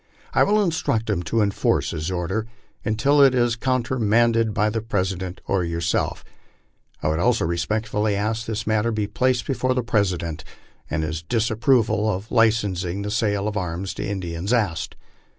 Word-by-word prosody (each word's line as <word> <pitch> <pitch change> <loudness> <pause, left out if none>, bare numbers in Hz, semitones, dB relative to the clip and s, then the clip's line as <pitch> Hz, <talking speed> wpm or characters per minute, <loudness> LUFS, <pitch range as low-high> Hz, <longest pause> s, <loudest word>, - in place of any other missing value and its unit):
I - - +3
will 210 +1 +4
instruct 140 - 0
him 95 -4 0
to 115 -1 +2
enforce 100 -1 +1
his 80 0 -3
order 95 +5 -2 0.4
until 135 +7 +3
it 135 -2 +6
is 120 -1 +2
countermanded 115 -2 +2
by 105 +1 +1
the 115 0 -2
President 95 -4 -2
or 95 -2 +1
yourself. 85 0 -1 0.8
I 75 - +2
would 80 +1 0
also 120 +2 +2
respectfully 105 +5 -1
ask 110 +3 -2
that 110 - -2
this 110 +1 -3
matter 110 +1 +1
be 110 -2 -1
placed 125 +3 0
before 130 -1 0
the 125 - 0
Presi 100 -5 +1
dent, 85 -2 -5 0.5
and 80 +1 -1
his 80 0 -3
disapproval 110 +2 +2
of 100 +3 -5
licensing 100 -5 +1
the 105 - -3
sale 105 -2 0
of 105 - -3
arms 90 -1 -3
to - - -5
Indians 95 -1 -3
asked. 85 -10 0
105 Hz, 170 wpm, -23 LUFS, 95-115 Hz, 0.8 s, it